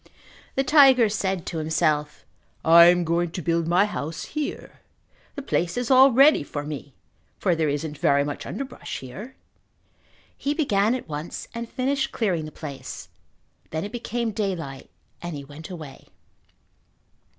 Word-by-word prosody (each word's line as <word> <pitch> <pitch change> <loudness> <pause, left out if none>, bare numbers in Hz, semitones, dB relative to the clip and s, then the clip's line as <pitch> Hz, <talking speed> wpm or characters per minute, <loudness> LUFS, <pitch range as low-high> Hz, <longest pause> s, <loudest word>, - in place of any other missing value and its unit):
The 270 - +2
tiger 265 -5 +6
said 190 -4 -2
to 165 - -4
himself, 155 -1 0 0.4
"I 170 +1 +9
am 175 0 +5
going 170 +1 0
to 180 - -4
build 165 0 0
my 180 +4 +4
house 160 -6 -5
here. 300 -1 -5 0.5
The 280 - -6
place 175 -8 -1
is 245 +1 -1
all 265 +1 +8
ready 275 +5 +6
for 145 0 -5
me 145 -2 -7 0.4
for 180 - +1
there 160 -2 0
isn't 145 +1 -3
very 140 -1 +3
much 145 0 -5
underbrush 275 -1 -6
here." 200 - -9 1.0
He 285 +1 -2
began 220 -7 +2
at 255 - -6
once 150 +1 -6
and 235 0 -5
finished 270 +1 -1
clearing 180 -9 -1
the 155 - -8
place. 140 -4 -8 0.6
Then 160 +1 -3
it 205 - -7
became 235 -1 -3
daylight 175 -10 -4 0.3
and 175 -2 -5
he 140 - -7
went 145 +5 -11
away. 155 -7 -10
175 Hz, 150 wpm, -24 LUFS, 155-240 Hz, 1.0 s, I